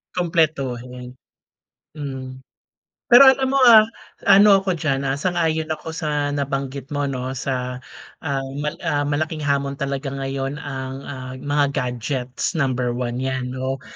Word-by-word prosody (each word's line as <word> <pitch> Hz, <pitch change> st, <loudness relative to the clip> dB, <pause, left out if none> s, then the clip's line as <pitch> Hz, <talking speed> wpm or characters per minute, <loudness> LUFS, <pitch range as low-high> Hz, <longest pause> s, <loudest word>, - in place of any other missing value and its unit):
Kumpletuhin, 130 Hz, -8 st, -1 dB, 0.8 s
hmm. 130 Hz, -3 st, -7 dB, 0.7 s
Pero 245 Hz, +3 st, +9 dB
alam 265 Hz, 0 st, +5 dB
mo, 275 Hz, -, +1 dB
ah, 220 Hz, -2 st, +8 dB, 0.4 s
ano 200 Hz, 0 st, +7 dB
ako 185 Hz, -3 st, -1 dB
diyan, 140 Hz, -4 st, 0 dB
ah, 135 Hz, 0 st, -1 dB
sang-ayon 160 Hz, -1 st, 0 dB
ako 160 Hz, -, -8 dB
sa 150 Hz, -3 st, -1 dB
nabanggit 140 Hz, 0 st, -3 dB
mo, 145 Hz, -1 st, -1 dB
'no, 130 Hz, 0 st, -3 dB
sa, 125 Hz, -1 st, -3 dB, 0.4 s
ah, 140 Hz, -3 st, -2 dB, 0.2 s
mal 150 Hz, -, -3 dB
ah, 145 Hz, 0 st, +1 dB
malaking 155 Hz, +2 st, -2 dB
hamon 140 Hz, -1 st, 0 dB
talaga 140 Hz, 0 st, -3 dB
ngayon 135 Hz, +1 st, -4 dB
ang, 135 Hz, -2 st, -5 dB
ah, 130 Hz, -2 st, -7 dB
mga 145 Hz, 0 st, +2 dB
gadgets. 125 Hz, -, -3 dB
Number 130 Hz, -6 st, 0 dB
1 120 Hz, 0 st, -3 dB
yan, 130 Hz, -1 st, -2 dB
'no? 130 Hz, +1 st, -3 dB
140 Hz, 140 wpm, -22 LUFS, 130-155 Hz, 0.8 s, Pero